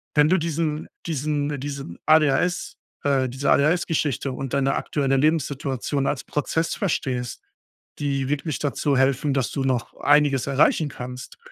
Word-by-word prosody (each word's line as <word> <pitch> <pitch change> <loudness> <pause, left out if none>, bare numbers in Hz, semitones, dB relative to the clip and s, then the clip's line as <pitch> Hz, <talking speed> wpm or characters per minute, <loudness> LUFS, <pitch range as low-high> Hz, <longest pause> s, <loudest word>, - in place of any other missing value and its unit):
wenn 150 0 +5
du 185 - +4
diesen 160 -2 -2 0.2
diesen 145 -2 -1
diesen 140 -10 -6
ADHS 155 +3 +2 0.3
äh, 135 -2 +2
diese 130 +3 0
ADHS-Geschichte 150 -3 +1
und 135 0 -5
deine 135 -1 +2
aktuelle 135 -2 0
Lebenssituation 140 -2 0
als 145 - -1
Prozess 160 +3 -1
verstehst, 130 - -2 0.6
die 140 -2 -1
wirklich 145 +1 -1
dazu 145 0 0
helfen, 135 +2 +2
dass 135 -3 0
du 135 - -2
noch 125 -3 -1
einiges 145 -3 +3
erreichen 145 +2 +3
kannst, 125 -1 -8
140 Hz, 135 wpm, -24 LUFS, 135-150 Hz, 0.6 s, wenn